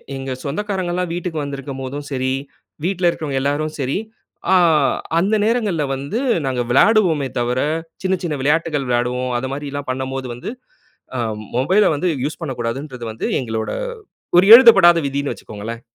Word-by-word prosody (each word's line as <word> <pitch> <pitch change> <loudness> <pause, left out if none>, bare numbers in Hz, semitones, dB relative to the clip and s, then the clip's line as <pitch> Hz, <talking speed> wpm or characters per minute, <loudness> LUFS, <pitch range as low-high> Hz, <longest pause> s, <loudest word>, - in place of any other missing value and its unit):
எங்க 135 0 -5
சொந்தக்காரங்கல்லாம் 180 +1 -2
வீட்டுக்கு 170 -3 -3
வந்திருக்கும்போதும் 140 0 -6
சரி, 130 0 -1 0.5
வீட்ல 180 -1 +1
இருக்கிறவங்க 145 -5 -2
எல்லாரும் 145 +3 -1
சரி, 135 +3 -1 0.5
ஆ - - +6 0.6
அந்த 200 +5 +2
நேரங்கள்ல 215 -9 +1
வந்து 140 - -3 0.3
நாங்க 130 -2 -1
விளாடுவோமே 165 - +4
தவிர, 120 +1 0 0.4
சின்ன 190 0 +1
சின்ன 155 -4 -1
விளையாட்டுகள் 150 -1 0
விளையாடுவோம். 125 +1 0
அத 130 - -4
மாதிரில்லாம் 145 -1 -5
பண்ணம்போது 130 0 -4
வந்து 125 - -6 0.7
அ - - -2 0.4
மொபைல 185 +12 +3
வந்து 165 +5 0 0.2
யூஸ் 150 - -4
பண்ணக்கூடாதுன்றது 125 -1 -4
வந்து 110 - -4
எங்களோட 110 -3 -3 0.7
ஒரு 185 - +6
எழுதப்படாத 195 -9 +8
விதின்னு 140 +1 -2
வச்சுக்கோங்களேன். 110 +2 -8
145 Hz, 130 wpm, -20 LUFS, 130-175 Hz, 0.7 s, எழுதப்படாத